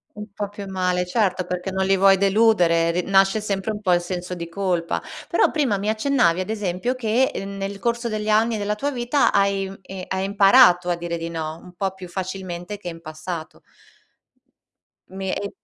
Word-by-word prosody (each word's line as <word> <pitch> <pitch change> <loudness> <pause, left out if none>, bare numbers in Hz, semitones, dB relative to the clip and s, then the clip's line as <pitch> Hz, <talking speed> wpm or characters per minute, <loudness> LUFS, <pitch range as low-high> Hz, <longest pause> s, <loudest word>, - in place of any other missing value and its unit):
Un 210 0 -7
po' 205 -1 -4
più 205 0 -8
male, 180 -1 0
certo, 185 -1 0
perché 180 +1 -4
non 190 0 0
li 195 0 +3
vuoi 195 0 +5
deludere. 195 -5 +3
R 175 +1 -1
nasce 195 +2 +4
sempre 205 0 -2
un 210 -1 -6
po' 185 -4 +2
il 175 - +3
senso 180 0 -5
di 170 -1 -6
colpa. 175 -2 -1 0.3
Però - - +3
prima 270 -10 +1
mi 200 +2 -2
accennavi 220 -6 +2
ad 185 - -3
esempio 210 +3 -2
che 250 +1 +1
nel 195 0 -5
corso 235 +3 -1
degli 215 -1 -3
anni 220 +1 +3
della 205 0 -1
tua 245 +7 -2
vita 250 +2 +1
hai 195 -1 +1
i 185 -1 -8
hai 190 0 -2
imparato 195 -2 +5
a 175 - +2
dire 170 0 -4
di 165 0 -4
no, 160 -1 -5
un 180 - -14
po' 190 +2 -2
più 190 -1 -10
facilmente 185 +1 -5
che 200 - -10
in 165 -1 -6
passato. 160 +1 -7 1.5
Mi 190 0 -5 0.2
i - - -4
195 Hz, 190 wpm, -22 LUFS, 180-210 Hz, 1.5 s, vuoi